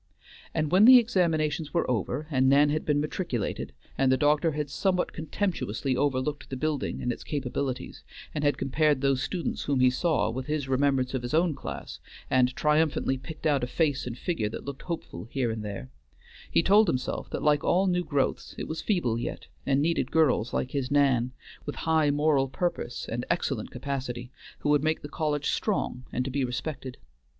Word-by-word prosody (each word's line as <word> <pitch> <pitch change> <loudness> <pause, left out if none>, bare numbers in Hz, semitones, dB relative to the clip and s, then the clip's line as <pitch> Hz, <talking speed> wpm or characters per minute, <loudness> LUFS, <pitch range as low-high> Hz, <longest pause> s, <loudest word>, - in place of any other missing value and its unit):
And 155 -1 -1
when 190 +4 +6
the 255 +1 +11
examinations 165 -9 +1
were 170 - +2
over, 125 +5 -1
and 130 -1 +3
Nan 145 +2 +5
had 155 +1 -1
been 145 -1 +2
matriculated, 150 - -3 0.3
and 135 -1 +4
the 130 - +4
doctor 150 +2 +3
had 150 -1 -3
somewhat 185 +1 0
contemptuously 155 - -2
overlooked 145 +2 -1
the 130 - -4
building 150 0 -2
and 125 - 0
its - - -6
capabilities, 135 -2 -3 0.3
and 150 - -2
had 145 -2 +2
compared 145 0 +1
those 135 -2 +2
students 175 +2 -3
whom 140 -2 +1
he 130 0 +5
saw 155 -1 +1
with 130 +2 -5
his 150 -3 -1
remembrance 130 -1 +1
of 130 - -1
his 120 +5 -2
own 165 0 +3
class, - - -7 0.3
and 125 -1 +3
triumphantly 150 -3 +2
picked 155 +5 -9
out 145 -4 +2
a - - 0
face 145 -2 0
and 120 -1 -5
figure 120 -12 -1
that - - -7
looked 140 -1 -6
hopeful 160 - -6
here 120 0 -1
and 110 -1 -4
there; 100 -11 -6 0.6
he - - +3
told 205 +3 +5
himself 130 -6 -2
that - - -4
like 150 -1 +3
all 185 +3 +3
new 180 -1 +1
growths 145 -5 -1
it - - -4
was 160 - -4
feeble 130 - 0
yet, - - -5 0.2
and 140 +1 +3
needed 165 +1 +1
girls 135 -7 +2
like 130 - -2
his 135 -3 -2
Nan, 135 -4 +3 0.4
with 145 - -3
high 160 -2 +3
moral 145 -2 +2
purpose 135 -4 -3
and 120 +2 -3
excellent 135 -9 -1
capacity, 125 -2 -4 0.3
who - - 0
would 145 -1 +4
make 155 0 0
the - - -5
college 150 -2 -1
strong 185 - -1
and 125 - -1
to 135 - -3
be 140 +1 0
respected. 130 +1 -4
145 Hz, 190 wpm, -27 LUFS, 130-155 Hz, 0.6 s, the